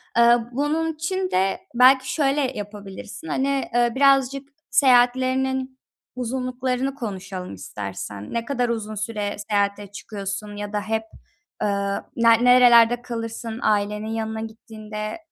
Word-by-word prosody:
Iıı, 235 Hz, 0 st, +4 dB
bunun 310 Hz, +5 st, 0 dB
için 370 Hz, +4 st, -2 dB
de 190 Hz, +1 st, +1 dB
belki 260 Hz, +2 st, +5 dB
şöyle 285 Hz, -1 st, +1 dB, 0.2 s
yapabilirsin. 205 Hz, -2 st, -8 dB
Hani, 270 Hz, -, 0 dB
aaa, 240 Hz, 0 st, +2 dB
birazcık 275 Hz, 0 st, +3 dB, 0.2 s
seyahatlerinin 260 Hz, +1 st, +2 dB, 0.4 s
uzunluklarını 255 Hz, +1 st, -2 dB
konuşalım 190 Hz, -, -6 dB
istersen. 100 Hz, +1 st, -7 dB
Ne 230 Hz, 0 st, -2 dB
kadar 250 Hz, -4 st, -1 dB
uzun 215 Hz, -2 st, -3 dB
süre 210 Hz, -1 st, -3 dB
seyahate 200 Hz, 0 st, 0 dB
çıkıyorsun 205 Hz, 0 st, -6 dB
ya 205 Hz, 0 st, -6 dB
da 205 Hz, -, 0 dB
hep, 220 Hz, +1 st, -2 dB, 0.6 s
ııı, 200 Hz, -1 st, -1 dB
na 230 Hz, 0 st, +5 dB
nerelerde 240 Hz, 0 st, +6 dB
kalırsın 230 Hz, -1 st, -5 dB
ailenin 210 Hz, 0 st, 0 dB
yanına 220 Hz, 0 st, -3 dB
gittiğinde? 215 Hz, 0 st, -7 dB
230 Hz, 120 wpm, -23 LUFS, 205-260 Hz, 0.6 s, nerelerde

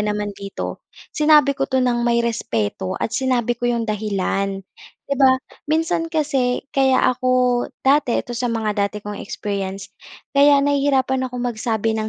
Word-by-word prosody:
naman 210 Hz, -1 st, -2 dB
dito 200 Hz, 0 st, -6 dB, 0.3 s
sinabi 300 Hz, -2 st, +5 dB
ko -, -, -2 dB
'to 260 Hz, -, 0 dB
ng 240 Hz, -1 st, +1 dB
may 235 Hz, 0 st, +2 dB
respeto 185 Hz, -, -2 dB
at 225 Hz, -, -3 dB
sinabi 250 Hz, -2 st, +1 dB
ko 240 Hz, 0 st, -2 dB
'yong 235 Hz, -1 st, 0 dB
dahilan, 195 Hz, -2 st, -2 dB, 0.4 s
'di 280 Hz, -, -2 dB
ba? 260 Hz, -1 st, +6 dB, 0.3 s
Minsan 325 Hz, +1 st, 0 dB
kasi 280 Hz, -6 st, 0 dB
kaya 265 Hz, -1 st, +3 dB
ako 255 Hz, +1 st, -3 dB, 0.6 s
dati 275 Hz, -2 st, +3 dB
ito 240 Hz, -, -3 dB
sa 240 Hz, +1 st, -2 dB
mga 220 Hz, -2 st, -1 dB
dati 210 Hz, -, -9 dB
kong 205 Hz, -1 st, -6 dB
experience. 195 Hz, -1 st, -5 dB, 0.4 s
Kaya 280 Hz, 0 st, +6 dB
nahihirapan 270 Hz, -2 st, +1 dB
akong 250 Hz, 0 st, -5 dB
magsabi 220 Hz, 0 st, -1 dB
ng 220 Hz, 0 st, -2 dB
240 Hz, 155 wpm, -21 LUFS, 210-270 Hz, 0.6 s, ba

